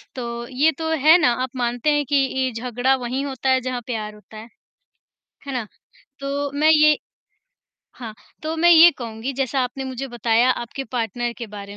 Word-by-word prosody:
तो 235 -1 -5
ये 280 +5 +2
तो 320 0 -3 0.2
है 320 +3 +8
ना, 300 -8 +3
आप 260 - -3
मानते 245 +3 0
हैं 290 -1 0
कि 285 - +1
ये 265 -1 +1
झगड़ा 245 +3 0
वहीं 255 +2 -3
होता 265 -1 -3
है 260 0 +3
जहाँ 250 -1 -4
प्यार 215 -3 -4
होता 210 +1 -15
है? 220 - -10 1.0
है 275 - -5
ना? 235 -4 -3 0.5
तो 280 +1 -3
मैं 310 +1 +4
ये 305 -1 +5 1.0
हाँ, 230 -3 -7 0.3
तो 315 +1 -3
मैं 345 +2 +3
ये 340 +1 +9
कहूँगी 230 +2 -5
जैसा 270 0 -1
आपने 255 +1 -3
मुझे 260 +1 -5
बताया 235 +1 +2
आपके 255 +2 -4
पार्टनर 240 0 -2
के 235 - -5
बारे 200 -1 -9
255 Hz, 185 wpm, -21 LUFS, 235-275 Hz, 1.0 s, ये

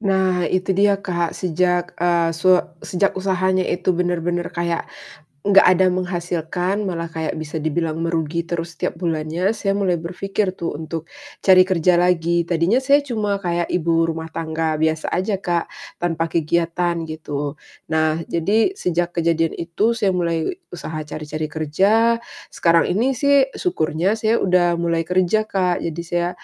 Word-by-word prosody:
Nah, 190 -4 +1
itu 185 +1 0
dia 200 +1 +3
Kak, 175 -4 -2
sejak, 180 0 0
eee, 170 -1 +2
su 180 +3 +4 0.2
sejak 195 +2 0
usahanya 185 0 +1
itu 185 - 0
benar-benar 175 0 -1
kayak, 170 -1 -2 0.5
nggak 195 +4 +5
ada 185 +1 +4
menghasilkan 180 +1 -2
malah 170 -3 -3
kayak 160 -1 -3
bisa 155 0 -5
dibilang 160 0 -1
merugi 165 0 -1
terus 170 0 -4
setiap 165 - -3
bulannya, 170 +4 -1
saya 200 -2 -1
mulai 195 -3 +1
berpikir 185 +4 -2
tuh 170 -4 -4
untuk 160 +1 -6 0.3
cari 185 -1 +6
kerja 180 -1 +2
lagi. 170 -1 +2
Tadinya 170 +5 +1
saya 280 +2 +5
cuma 210 -4 -1
kayak 175 -2 -2
ibu 165 -1 +2
rumah 160 0 -3
tangga 160 -1 -1
biasa 160 0 0
aja 190 +1 -1
Kak, 175 -3 -2 0.2
tanpa 165 -1 -1
kegiatan 170 +1 0
gitu. 145 -2 -4 0.3
Nah, 160 0 +1
jadi 215 - +1
sejak 175 - -1
kejadian 165 -1 +1
itu 200 +8 0
saya 205 -4 +1
mulai 170 - -1 0.2
usaha 155 -2 -5
cari-cari 155 +1 -4
kerja, 195 +10 +2 0.3
sekarang 170 -1 +3
ini 245 +8 +1
sih 280 0 +4
syukurnya 175 - 0
saya 220 +1 +2
udah 175 -2 +3
mulai 170 -1 0
kerja, 185 +4 +1
Kak. 180 -2 +1
Jadi, 170 0 -3
saya 175 +1 0
175 Hz, 150 wpm, -21 LUFS, 165-190 Hz, 0.5 s, cari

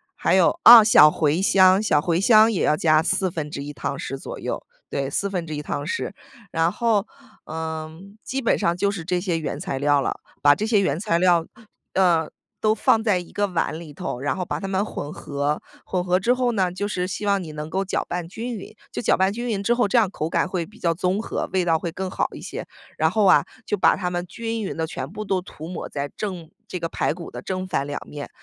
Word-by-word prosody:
还 - - +2
有， - - +3
啊， 235 -2 +11
小 155 -8 +8
茴 155 +2 +1
香， 190 0 +5
小 160 -9 +3
茴 170 +3 0
香 220 +1 +6
也 195 - 0
要 150 - +3
加 155 -1 +4
1/4 160 -6 -2
汤 140 - -4
匙 135 - -5
左 - - -8
右， - - -4 0.3
对， 140 -1 -2
1/4 165 -3 -2
汤 145 - -3
匙。 185 - -3 0.4
然 165 +1 +2
后， 220 -1 +1 0.4
嗯， 160 +5 -6
基 270 +1 -3
本 230 - +3
上 170 +1 +1
就 200 +2 +1
是 190 -5 -5
这 180 +2 0
些 175 -3 -1
原 155 - -4
材 135 - -3
料 145 0 +3
了。 - - -3 0.2
把 145 0 +7
这 215 +8 -2
些 215 -3 +3
原 155 -5 0
材 170 -3 +1
料， 175 -2 +4 0.5
呃， 170 -4 +3 0.3
都 215 0 +2
放 220 +1 +3
在 210 -4 +2
一 175 -1 -7
个 205 0 0
碗 165 -3 -2
里 160 -3 -10
头， 145 -5 -5
然 145 +2 -1
后 185 - -2
把 - - -3
它 195 - -5
们 195 +1 0
混 150 -8 -6
合， 145 +1 -2 0.2
混 180 -1 -1
合 180 0 +2
之 235 +6 +2
后 250 -1 +1
呢 190 -5 +1
就 185 +3 -4
是 180 -3 -2
希 200 +2 -4
望 200 -1 +2
你 160 -4 -8
能 150 +1 -6
够 190 +3 -1
搅 190 - -1
拌 175 -1 -3
均 230 +7 -5
匀， 210 +2 -10 0.2
就 - - -4
搅 - - +3
拌 190 +1 +2
均 240 +4 -4
匀 205 -4 -2
之 235 - +3
后， 240 -3 +2
这 220 - +2
样 215 -5 +3
口 155 -4 -3
感 - - +1
会 180 -3 -2
比 210 - -18
较 170 -1 +1
综 185 +4 0
合， - - -3
味 185 -1 +2
道 165 -2 +2
会 170 -1 -4
更 190 0 -4
好 - - 0
一 - - -9
些。 - - -6 0.3
然 160 +1 +3
后 215 +5 +1
啊， 185 - +6 0.2
就 210 - -1
把 - - +4
它 180 -2 -2
们 175 0 -3
均 225 +4 -4
匀 195 - -4
地 160 - -1
全 140 -4 -6
部 210 +4 -6
都 190 -3 0
涂 165 -3 -10
抹 180 - -5
在 145 0 -4
正 180 -6 -5 0.2
这 185 - -4
个 165 -1 -3
排 - - 0
骨 170 0 -9
的 - - -7
正 185 0 -3
反 150 -6 -2
2 145 - -4
面。 145 -1 -8
180 Hz, 250 characters per minute, -23 LUFS, 160-200 Hz, 0.5 s, 啊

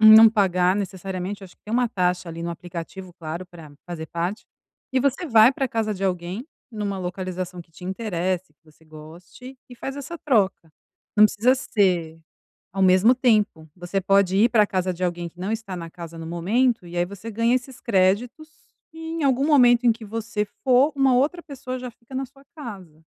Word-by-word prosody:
não 220 +1 +10
pagar 185 -3 +2
necessariamente 190 0 -4
acho 180 - -15
que - - -55
tem 215 - -7
uma 245 0 +2
taxa 180 -4 0
ali 165 0 -6
no 170 - -3
aplicativo, 175 +2 -8
claro, 170 +1 -6
pra 165 -4 -13
fazer 165 -2 -6
parte 175 +5 -3 0.5
e 260 - +2
você 280 +6 0
vai 230 -2 +6
pra 270 0 -1
casa 225 -2 -1
de 195 0 -4
alguém 185 +6 -3 0.2
numa 205 -3 -3
localização 180 0 -5
que 165 - -33
te 180 - -12
interesse, 185 -4 -2
que 150 - -47
você 155 +1 -23
goste, 165 +12 -12
e - - -9
faz 270 +3 -6
essa 285 +4 -6
troca. 200 - +1 0.5
Não 210 - +8
precisa 220 +5 +3
ser 180 -10 0 0.5
ao 195 - -2
mesmo 190 +6 +6
tempo, 215 -10 +1
você 180 +2 -3
pode 195 0 +3
ir 225 +4 +5
pra 220 -3 +4
casa 185 -1 -1
de 180 +1 -5
alguém 175 -1 -2
que 175 - -23
não 190 +4 -2
está 220 -4 -4
na 170 -2 -7
casa 170 -1 -9
no 165 - -7
momento, 210 +7 +1
e 175 +1 -7
aí 175 - +2
você 200 +4 -9
ganha 230 +3 +2
esses 255 0 -5
créditos, 235 +8 +1 0.4
e - - -14
em 325 0 -4
algum 270 0 +2
momento 245 -5 +5
em - - +7
que 225 0 -6
você 215 0 -3 0.2
for, 265 +3 +4
uma 270 -2 +4
outra 305 +7 +1
pessoa 255 -3 -6
já 250 -1 -7
fica 235 +3 -14
na 265 +1 -2
sua 275 +2 -21
casa. 190 - -10
200 Hz, 195 wpm, -23 LUFS, 180-245 Hz, 0.5 s, não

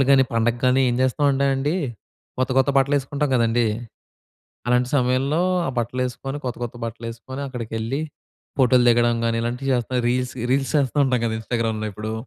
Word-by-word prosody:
బట్టలు 135 - +5
గాని, 135 -1 +6
పండగ 115 +1 +2
గాని 130 +1 +4
ఏం - - 0
జేస్తామంటే 140 +1 +2
అండి. 145 +6 0 0.6
కొత్త 130 +1 0
కొత్త 140 - +2
బట్టలేసుకుంటాం 140 +1 0
కదండీ! 115 0 +2 1.0
అలాంటి 125 0 +2
సమయంలో 135 +6 +1 0.3
ఆ - - 0
బట్టలేసుకొని, 125 +3 -3
కొత్త 125 - -3
కొత్త 120 +1 -7
బట్టలేసుకొని 115 +4 -7
అక్కడికెళ్ళి, 115 +1 -3 0.6
ఫోటోలు 125 -1 +5
దిగడం 120 0 +4
గాని, 115 0 +1
ఇలాంటివి 125 +3 -3
చేస్తాం. 125 +1 -1
రీల్స్ 125 0 0 0.2
రీల్స్ 135 +1 +1
చేస్తూ 140 -1 0
ఉంటాం 130 -2 +1
గదా! 110 -1 0
ఇన్‌స్టాగ్రామ్‌లో 110 -2 -2
ఇప్పుడు. 110 +2 -5
125 Hz, 150 wpm, -22 LUFS, 115-135 Hz, 1.0 s, గాని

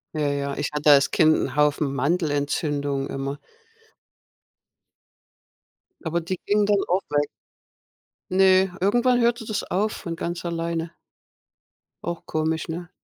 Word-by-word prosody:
Ja, 150 -1 0
ja, 140 0 -2
ich 145 - -2
hatte 150 0 +4
als 140 -1 +5
Kind 155 -1 +4
'n 135 - -3
Haufen 150 -1 +2
Mandelentzündungen 145 -2 -1
immer. 135 +1 -4 2.7
Aber 170 +1 -1
die 180 +3 -3
gingen 205 0 +2
dann 205 0 +3
auch 185 +2 +1
weg. 145 0 +1 1.1
Ne, 190 0 +5
irgendwann 240 +6 +3
hörte 235 -1 +1
das 215 -1 -2
auf 210 +4 -1
von 170 -5 -6
ganz 170 +1 -4
alleine. 165 -1 -3 1.1
Auch 170 -1 -5
komisch, 160 +1 -1
ne? 175 +2 -6
165 Hz, 125 wpm, -24 LUFS, 145-185 Hz, 2.7 s, als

